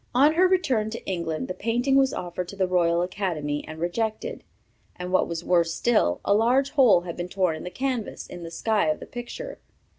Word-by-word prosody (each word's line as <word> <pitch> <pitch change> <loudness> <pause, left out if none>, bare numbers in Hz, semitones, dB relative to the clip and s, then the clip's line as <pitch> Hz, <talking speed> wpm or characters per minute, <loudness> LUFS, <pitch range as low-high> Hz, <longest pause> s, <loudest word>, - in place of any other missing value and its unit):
On 285 +5 +6
her 365 +3 +5
return 270 - +1
to 230 - -7
England 170 -4 -3
the 185 - -3
painting 245 +7 0
was 270 -1 +4
offered 175 0 -4
to 200 - -8
the 190 -1 +1
Royal 175 -1 +2
Academy 170 -6 -2
and 155 - -8
rejected. 220 - -2 0.5
And 180 0 -6
what 185 - +3
was 170 0 -4
worse 170 -2 +2
still, 210 - +2
a 200 - +4
large 250 +6 +3
hole 250 - +5
had 175 -1 -6
been 175 0 -5
torn 185 -4 +1
in 155 - -8
the 180 - -5
canvas, 255 0 -3
in 175 - -9
the 165 - -6
sky 210 +4 0
of 155 - 0
the - - -8
picture. 245 - -7
190 Hz, 210 wpm, -25 LUFS, 175-245 Hz, 0.5 s, On